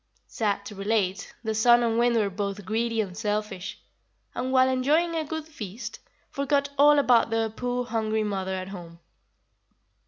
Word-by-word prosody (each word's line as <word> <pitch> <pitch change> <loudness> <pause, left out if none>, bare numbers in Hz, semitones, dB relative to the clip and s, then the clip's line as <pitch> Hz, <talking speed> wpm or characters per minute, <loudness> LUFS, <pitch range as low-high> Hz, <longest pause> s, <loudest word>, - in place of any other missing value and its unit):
Sad 205 -3 -2
to 210 - -7
relate, 200 -1 -1
the 220 -1 -1
Sun 240 +2 +5
and 230 0 +1
Wind 240 0 +3
were 210 -3 +1
both 200 0 -4
greedy 225 +2 0
and 190 -4 -5
selfish, 210 -3 -3 0.6
and, 255 +1 -3
while 260 0 +5
enjoying 290 +7 +2
the 325 -1 -1
good 315 +1 -5
feast, 230 - -8 0.3
forgot 280 0 0
all 295 +1 +6
about 245 -5 +4
their 225 -1 0
poor 245 +2 -2
hungry 220 -2 -1
mother 190 -2 -2
at 185 0 -5
home. 170 -3 -10
225 Hz, 160 wpm, -26 LUFS, 205-255 Hz, 0.6 s, all